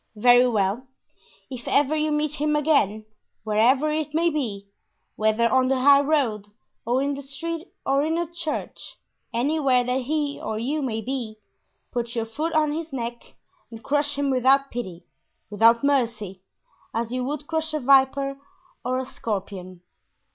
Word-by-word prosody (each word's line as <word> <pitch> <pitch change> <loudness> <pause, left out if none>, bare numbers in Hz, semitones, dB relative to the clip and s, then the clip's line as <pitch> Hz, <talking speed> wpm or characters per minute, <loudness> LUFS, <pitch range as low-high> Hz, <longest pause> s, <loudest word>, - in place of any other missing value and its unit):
"Very 245 +3 +6
well; 215 +2 0 0.6
if 245 -2 -7
ever 290 +2 +2
you 310 0 0
meet 300 0 0
him 300 0 0
again, 275 -9 +2 0.4
wherever 240 +8 +3
it 305 0 -2
may 335 +1 +3
be, 220 -10 -3 0.5
whether 220 +2 +2
on 260 +1 +3
the 260 -1 +1
high 280 +1 +7
road 265 -9 0 0.4
or 250 +3 +2
in 285 0 0
the 280 - -6
street 330 +6 -5 0.2
or 275 +1 +2
in 320 +2 0
a 345 - 0
church, 340 -2 -5 0.3
anywhere 260 +1 +2
that 250 +2 -1
he 290 +2 -2
or 215 - -3
you 280 +7 -1
may 225 -5 -2
be, 235 -3 -4 0.5
put 235 -1 -3
your 230 -1 -1
foot 305 +9 -3
on 310 -1 +2
his 320 +1 -4
neck 240 -2 -6 0.3
and 225 -1 -11
crush 290 0 0
him 285 -1 0
without 265 +2 +3
pity, 185 -8 -6 0.5
without 230 +3 +4
mercy, 230 -9 0 0.5
as 230 0 -2
you 255 0 -2
would 290 +2 -4
crush 320 0 -2
a 305 - -1
viper 275 +1 +3 0.4
or 255 +1 -1
a 260 - -2
scorpion! 195 -7 -5
265 Hz, 160 wpm, -24 LUFS, 230-295 Hz, 0.6 s, high